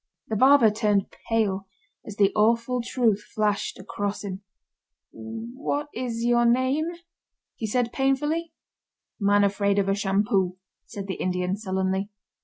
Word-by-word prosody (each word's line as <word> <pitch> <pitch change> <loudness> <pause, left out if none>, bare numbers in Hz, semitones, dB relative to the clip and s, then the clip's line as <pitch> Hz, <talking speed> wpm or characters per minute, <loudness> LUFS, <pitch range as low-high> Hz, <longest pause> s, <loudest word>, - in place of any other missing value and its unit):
The 220 - -1
barber 260 -1 +6
turned 210 -2 +1 0.2
pale 200 -4 0 0.4
as 210 - -8
the 200 -1 +4
awful 230 +3 +2
truth 235 -4 +1
flashed 210 -2 0
across 205 0 -4
him. 195 -1 -5 0.7
"What 240 +6 -4
is 235 -1 -3
your 240 0 +4
name?" 260 +6 +2 0.7
he 220 - -4
said 240 +2 0
painfully. 295 +5 0 0.7
"Man 205 0 +4
Afraid 200 0 +1
Of 200 -1 +2
A 195 - +3
Shampoo," 195 -2 +1 0.3
said 200 -1 -6
the 190 -2 -5
Indian, 180 0 0
sullenly. 190 -1 -1
215 Hz, 130 wpm, -25 LUFS, 200-240 Hz, 0.7 s, barber